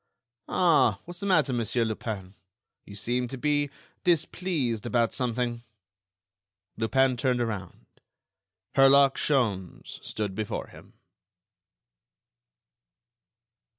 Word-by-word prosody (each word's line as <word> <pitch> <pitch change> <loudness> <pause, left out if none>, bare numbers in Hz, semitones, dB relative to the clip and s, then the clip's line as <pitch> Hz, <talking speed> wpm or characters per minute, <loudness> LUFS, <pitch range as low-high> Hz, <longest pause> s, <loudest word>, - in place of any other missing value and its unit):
"Ah! 140 - +3
what's 175 0 -9
the 200 - -3
matter, 150 -9 +3
Monsieur 120 0 0
Lupin? 105 -4 -5 0.5
You 100 - -10
seem 125 +5 -1
to 135 - -6
be 145 +1 +1 0.3
displeased 160 - 0
about 120 -1 +1
something." 120 -1 -1 1.1
Lupin 130 +4 +2
turned 125 0 +1
around. 105 -6 -4 0.9
Herlock 135 0 +6
Sholmes 105 - -1
stood 105 -3 -3
before 105 +1 -4
him! - - -16
125 Hz, 90 wpm, -27 LUFS, 110-140 Hz, 1.1 s, Herlock